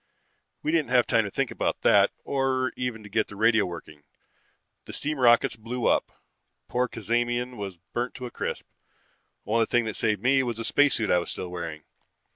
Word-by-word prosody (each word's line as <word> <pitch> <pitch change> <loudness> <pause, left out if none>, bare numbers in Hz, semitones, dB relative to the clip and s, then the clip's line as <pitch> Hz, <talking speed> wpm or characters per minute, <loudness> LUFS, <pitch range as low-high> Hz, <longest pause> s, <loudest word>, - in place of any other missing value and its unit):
"We 155 - 0
didn't 160 -6 +1
have 125 -1 +4
time 115 -1 +2
to - - -3
think - - -1
about - - -2
that, - - +5
or 130 -1 0
even 125 -3 -4
to - - -10
get 110 +1 0
the 100 - -11
radio 110 0 +3
working. 80 -3 -9 0.8
The - - -8
steam 150 -1 -2
rockets 120 -1 +4
blew 115 +2 -4
up. - - +2 0.6
Poor 125 +1 0
Cazamian 120 +2 -1
was 100 -4 -6 0.2
burnt 120 +1 -2
to 125 - -6
a 120 - -7
crisp. - - -4 0.8
Only 115 +1 +2
thing 120 -1 +2
that 110 - -3
saved 105 -2 0
me 135 +2 +4
was 120 -3 -3
the 115 - -4
spacesuit 140 -6 +3
I 90 - +5
was 85 - -5
still 90 - -5
wearing. 85 -3 -6
115 Hz, 190 wpm, -26 LUFS, 105-125 Hz, 0.8 s, that